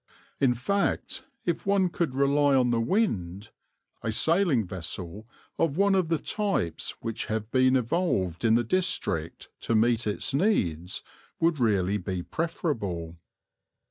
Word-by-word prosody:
In 125 -3 +3
fact, 200 - -1 0.2
if 175 +2 -2
one 195 -2 +3
could 165 -6 -2
rely 140 +1 +3
on 125 -2 +3
the 115 -1 +2
wind, 110 - -1 0.5
a 110 - -2
sailing 160 - +2
vessel 90 +3 -6 0.3
of 160 -2 +1
one 200 0 +4
of 185 -3 +2
the 165 - +2
types 195 - -2
which 115 -1 -4
have 110 0 -3
been 130 0 +4
evolved 120 - 0
in 115 -1 +4
the 120 - +3
district 145 - -1
to 115 - -1
meet 115 +1 +2
its 105 - -2
needs 95 - 0 0.4
would 165 -2 +2
really 100 -4 +2
be 90 -1 -4
preferable. 105 - -3
120 Hz, 140 wpm, -27 LUFS, 100-165 Hz, 0.5 s, one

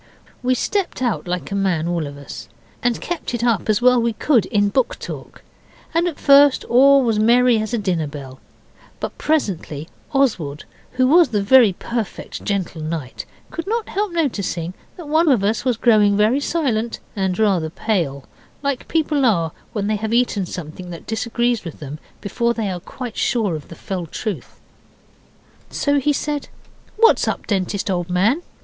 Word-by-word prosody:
We 255 0 +2
stepped 390 - -1
out 235 -6 -1
like 180 +2 -3
a - - -1
man 185 -5 0
all 170 -3 -1
of 140 0 -9
us, 120 -7 -9 0.3
and 245 -1 +1
kept 335 -7 -4
it 235 - -3
up 230 -4 +1
as 215 +3 +2
well 250 0 +6
as - - 0
we 235 -1 +1
could 235 - +2
in 205 -1 +2
book 255 +4 0
talk, - - -9 0.5
and 335 +2 +2
at 330 - -4
first 280 -1 +6
all 275 +3 +5
was 225 -3 +1
merry 240 +1 +4
as 215 +1 -3
a 240 - 0
dinner 180 -7 -1
bell; 135 -3 -9 0.6
but - - -4
presently 180 - -1 0.2
Oswald, 185 - 0 0.3
who 255 0 +2
was 320 +2 +5
the 210 -4 0
'very 230 -2 +6
perfect 230 +3 -5
gentle 190 -5 -2
knight', 155 -5 -5 0.2
could 335 +2 -5
not 450 +1 -1
help 410 -1 -1
noticing 200 - -2 0.2
that 340 -4 -9
one 315 +2 +3
of 240 -8 +3
us 215 +2 0
was 250 -3 +1
growing 210 -4 +4
very 215 +6 +3
silent 250 -8 -1 0.2
and 190 -3 -1
rather 190 -7 +2
pale, 160 -8 -1 0.4
like 280 -3 -2
people 305 -3 +1
are 170 -9 +2 0.2
when 210 -4 -2
they 215 +1 0
have 220 +2 -1
eaten 220 -6 +1
something 180 +1 -7
that 170 -1 -9
disagrees 235 +1 -1
with 165 -4 -8
them 150 +1 -7 0.2
before 235 +3 0
they 215 -4 -2
are 180 - -4
quite 240 +6 -8
sure 215 -8 +1
of 150 - -8
the 165 - -10
fell 180 -2 -5
truth. 215 +6 -5 1.1
So 285 0 +1
he 295 +2 +2
said, 290 0 -2 0.5
'What's 455 +1 +5
up, - - -2
Dentist, 195 0 -1
old 175 -1 -2
man? 205 - +2
220 Hz, 180 wpm, -20 LUFS, 180-260 Hz, 1.1 s, well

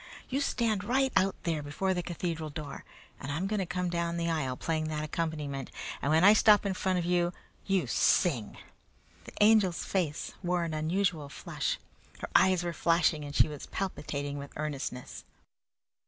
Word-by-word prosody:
You 270 +2 0
stand 225 -7 0
right 265 +1 +1
out 195 +1 +3
there 160 -3 -1
before 170 +7 -1
the 180 - -1
cathedral 170 -2 -3
door, 145 -1 -7 0.4
and 135 - -5
I'm 160 +6 -1
going 210 +1 -1
to 190 - -1
come 180 +1 -1
down 170 -1 -1
the 170 0 0
aisle 135 -6 -1
playing 155 +1 -1
that 155 -1 -2
accompaniment, 150 -4 -3 0.3
and 140 - 0
when 160 +2 +4
I 205 +2 +9
stop 210 -1 +5
in 195 - 0
front 185 0 0
of 175 - -1
you 175 0 +1 0.3
you 195 -2 +2
sing!" 130 - +2 0.7
The - - -1
Angel's 210 -5 +4
face 170 -6 -2
wore 180 -1 0
an 165 -1 -3
unusual 160 -1 0
flush. - - -3 0.4
Her - - -6
eyes 185 -2 +5
were 175 -1 -2
flashing 165 -2 +2
and 145 0 -7
she - - +5
was 150 -2 -8
palpitating 145 -6 -3
with 140 0 -9
earnestness. 140 -4 -5
170 Hz, 175 wpm, -30 LUFS, 150-190 Hz, 0.7 s, I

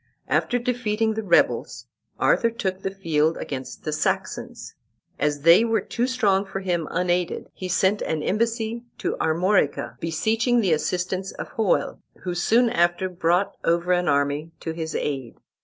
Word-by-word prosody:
After 245 - +1
defeating 225 -3 0
the 220 - -3
rebels, 185 -5 +1 0.3
Arthur 230 - +3
took 190 -5 -3
the 195 - -2
field 165 -5 0
against 130 -2 -6
the 155 - -2
Saxons. 155 - -3 0.5
As 145 0 0
they 170 +7 +7
were 225 -1 +2
too 245 +1 -2
strong 205 -7 +2
for 195 -1 -6
him 175 -4 -1
unaided, 180 0 -1
he 185 - -6
sent 190 +3 +2
an 155 -1 -2
embassy 230 +2 -1 0.2
to - - -2
Armorica, 170 -1 +1
beseeching 225 +9 +1
the 190 -7 +3
assistance 180 +4 -2
of - - -7
Hoel, 220 -4 0 0.2
who 180 - -2
soon 230 +7 +3
after 175 +2 +1
brought 175 +2 +1
over 170 +2 +1
an 180 0 +2
army 145 +2 +1
to 165 - -3
his 160 -1 -5
aid. 135 -5 -3
180 Hz, 155 wpm, -24 LUFS, 165-220 Hz, 0.5 s, they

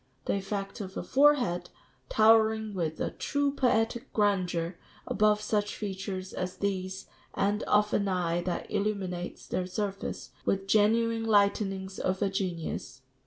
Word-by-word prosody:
The - - +1
effect 195 +1 -3
of 190 -1 -7
a - - -3
forehead, 255 -12 +3 0.4
towering 220 -1 +4
with 165 -4 -2
a - - -1
true 285 -1 -1
poetic 240 -1 +1
grandeur 180 -5 0 0.3
above 210 0 +2
such 210 -1 -1
features 190 -2 -5
as 185 0 -4
these, 190 -1 -2 0.3
and 205 +2 +1
of 210 0 +3
an 200 - +2
eye 175 -2 0
that 175 0 -3
illuminates 195 -4 -2
their 180 0 -2
surface 195 +1 -4
with 195 0 0
genuine 225 +2 +3
lightenings 200 -2 +1
of 185 0 0
genius 170 -8 -3
200 Hz, 130 wpm, -29 LUFS, 185-215 Hz, 0.4 s, towering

